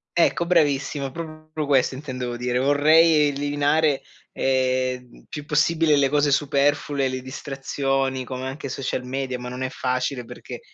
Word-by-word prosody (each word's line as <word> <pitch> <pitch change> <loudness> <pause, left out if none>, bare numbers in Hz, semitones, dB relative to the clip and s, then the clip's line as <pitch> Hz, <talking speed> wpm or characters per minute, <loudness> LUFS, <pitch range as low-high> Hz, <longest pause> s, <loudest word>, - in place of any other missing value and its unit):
Ecco, 170 0 +2
bravissimo, 145 -4 +1
proprio 155 0 -6
questo 135 -2 +2
intendevo 125 -3 -5
dire, 125 0 -1
vorrei 150 +2 +5
eliminare, 145 +1 +1 0.3
ehm, 130 -1 -1
più 150 - -7
possibile 155 +1 +3
le 140 -1 +4
cose 145 0 +2
superflue, 140 0 +1
le 130 0 -3
distrazioni 135 0 -2
come 130 0 -6
anche 135 +1 -5
social 130 -1 -3
media, 130 0 -3
ma 125 0 -6
non 125 +1 -5
è 130 - -2
facile 130 0 -2
perchè - - -9
135 Hz, 140 wpm, -23 LUFS, 130-150 Hz, 0.3 s, vorrei